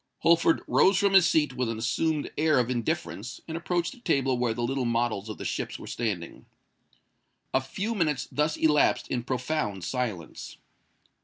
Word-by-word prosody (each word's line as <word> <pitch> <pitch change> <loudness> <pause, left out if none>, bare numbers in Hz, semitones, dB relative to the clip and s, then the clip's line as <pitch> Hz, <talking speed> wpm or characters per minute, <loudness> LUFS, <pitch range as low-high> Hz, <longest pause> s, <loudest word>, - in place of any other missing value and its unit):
Holford 165 0 +4
rose 190 0 +4
from 200 +1 +2
his 190 -3 +7
seat 150 -4 +2
with 125 -2 -1
an 115 - -3
assumed 150 +6 -1
air 155 -1 +3
of 125 0 +1
indifference, 120 - -3
and 160 - -5
approached 175 +1 -1
the - - -13
table 135 - +1
where 120 -2 0
the 120 - -2
little 135 +2 -1
models 115 -3 -1
of 110 - -6
the - - -7
ships - - -3
were - - -10
standing. 100 -8 -4 1.1
A 130 - +3
few 195 - -3
minutes 155 - 0
thus 150 +1 0
elapsed 150 -2 +3
in 125 - -1
profound 125 - -2
silence. 110 -7 -4
135 Hz, 170 wpm, -27 LUFS, 120-160 Hz, 1.1 s, his